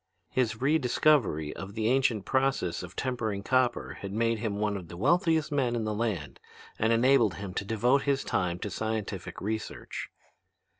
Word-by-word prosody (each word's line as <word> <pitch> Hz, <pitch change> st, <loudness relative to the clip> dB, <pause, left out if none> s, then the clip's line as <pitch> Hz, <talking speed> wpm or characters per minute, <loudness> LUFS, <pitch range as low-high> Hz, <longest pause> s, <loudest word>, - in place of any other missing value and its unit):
"His 110 Hz, -4 st, 0 dB
rediscovery 130 Hz, -, +2 dB
of 100 Hz, +1 st, -8 dB
the 110 Hz, -1 st, 0 dB
ancient 120 Hz, -5 st, +2 dB
process 130 Hz, -10 st, 0 dB
of 90 Hz, -1 st, -9 dB
tempering 110 Hz, -6 st, -2 dB
copper 130 Hz, 0 st, +1 dB
had 100 Hz, -, -5 dB
made 115 Hz, +1 st, +1 dB
him 105 Hz, -2 st, -2 dB
one 105 Hz, 0 st, 0 dB
of 90 Hz, -4 st, -6 dB
the 85 Hz, -, -9 dB
wealthiest 160 Hz, -, +2 dB
men 130 Hz, -5 st, +1 dB
in 115 Hz, -, -1 dB
the 110 Hz, 0 st, -1 dB
land 105 Hz, -10 st, -2 dB, 0.4 s
and 110 Hz, +1 st, +2 dB
enabled 115 Hz, -4 st, +4 dB
him 100 Hz, -2 st, -6 dB
to 100 Hz, -, -2 dB
devote 120 Hz, +6 st, +2 dB
his 140 Hz, -1 st, 0 dB
time 90 Hz, -1 st, 0 dB
to 105 Hz, -, -4 dB
scientific 110 Hz, -3 st, -3 dB
research. 110 Hz, +2 st, -4 dB
110 Hz, 165 wpm, -29 LUFS, 100-130 Hz, 0.4 s, enabled